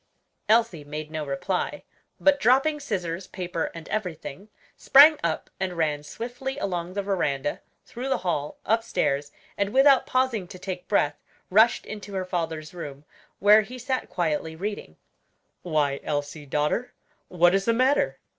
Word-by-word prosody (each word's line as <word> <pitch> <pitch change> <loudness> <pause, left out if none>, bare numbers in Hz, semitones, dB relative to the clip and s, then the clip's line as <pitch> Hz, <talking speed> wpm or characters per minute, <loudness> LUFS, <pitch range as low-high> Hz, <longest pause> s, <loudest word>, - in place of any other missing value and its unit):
Elsie 220 -8 +3
made 150 +1 -6
no 155 -1 -3
reply, 145 +7 -2 0.4
but 290 -1 +4
dropping 275 +5 +3
scissors, 185 - -3
paper, 175 -3 -3
and 165 -1 -9
everything, 185 -1 -5 0.3
sprang 295 +3 +7
up 165 -2 -2
and 185 -1 -2
ran 150 -3 0
swiftly 245 - -6
along 175 -2 -3
the 200 0 -2
veranda, 145 -8 -1 0.2
through 255 +3 -6
the - - +2
hall, 150 -4 -2
upstairs, 205 -11 0 0.3
and 200 0 +1
without 270 +1 +5
pausing 255 -7 0
to 185 - -10
take 185 -1 -6
breath, 145 -8 +1 0.3
rushed 220 +5 +4
into 205 -2 -8
her 185 -1 -2
father's 165 -3 -3
room, 145 -4 -8 0.3
where 210 +2 +7
he 245 +5 -9
sat 255 +1 -3
quietly 160 -1 -1
reading. 190 - -5 0.6
"Why, 150 -5 0
Elsie, 145 0 -3
daughter, 150 - -1 0.3
what 175 0 +4
is 195 0 +1
the 230 - +3
matter?" 260 +4 +2
185 Hz, 145 wpm, -26 LUFS, 155-230 Hz, 0.6 s, sprang